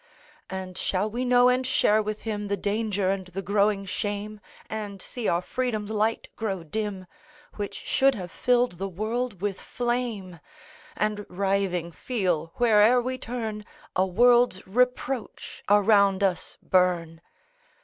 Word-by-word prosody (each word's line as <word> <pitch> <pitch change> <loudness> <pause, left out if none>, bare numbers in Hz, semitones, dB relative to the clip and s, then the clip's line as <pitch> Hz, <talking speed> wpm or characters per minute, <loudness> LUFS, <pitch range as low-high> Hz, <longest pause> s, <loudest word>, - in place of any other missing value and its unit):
And 185 -1 -6
shall 200 +3 0
we 245 +3 -2
know 245 0 +5
and 250 +1 +3
share 220 -4 +3
with 215 0 -4
him 210 -2 -3
The 200 0 -1
danger 205 -1 0
and 190 -1 -3
the 190 +2 -6
growing 200 +1 +1
shame? 205 +2 -4 0.3
And 210 -3 -5
see 235 +3 -4
our 170 +1 +1
Freedom's 220 -4 -2
light 220 +1 0
grow 195 -6 -3
dim, 195 +2 -4 0.5
Which 205 -1 -4
should 270 0 +2
have 180 -4 -6
filled 245 -7 +1
the 195 - -2
world 215 +2 -3
with 200 -2 -2
flame? 235 -7 -3 0.6
And, 210 -1 -1
writhing, 190 -2 0
feel, 175 -7 -1
where'er 230 +1 +5
we 255 +1 -3
turn, 225 -4 -4 0.3
A 185 +1 +3
world's 240 +1 +4
reproach 250 +2 -1
around 200 -1 +4
us 185 -2 -1
burn? 175 -3 +1
210 Hz, 140 wpm, -26 LUFS, 190-235 Hz, 0.6 s, know